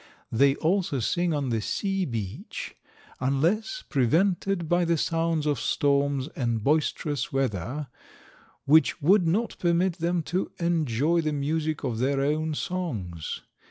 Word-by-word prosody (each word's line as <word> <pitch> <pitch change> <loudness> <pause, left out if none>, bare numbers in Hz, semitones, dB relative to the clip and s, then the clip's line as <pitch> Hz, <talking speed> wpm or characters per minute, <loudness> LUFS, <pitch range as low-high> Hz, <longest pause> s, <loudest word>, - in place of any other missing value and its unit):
They 135 +4 +4
also 170 -4 0
sing 170 +9 0
on 145 -4 -1
the 115 -2 0
sea 195 - -1
beach, 110 - -5 0.4
unless 170 - 0
prevented 170 - +1
by 175 +2 +2
the 170 -1 +2
sounds 165 0 0
of 145 -5 +1
storms 140 -1 +1
and 120 -7 -2
boisterous 145 -2 0
weather, 135 - -2 0.8
which 160 +4 +4
would 180 +3 +4
not 215 +8 0
permit 175 +1 +1
them 170 0 0
to 180 +5 -2
enjoy 165 -2 +1
the 155 -1 -1
music 155 +2 -1
of 120 -5 -2
their 135 +2 +1
own 155 +2 0
songs. 110 - -4
155 Hz, 130 wpm, -26 LUFS, 135-170 Hz, 0.8 s, They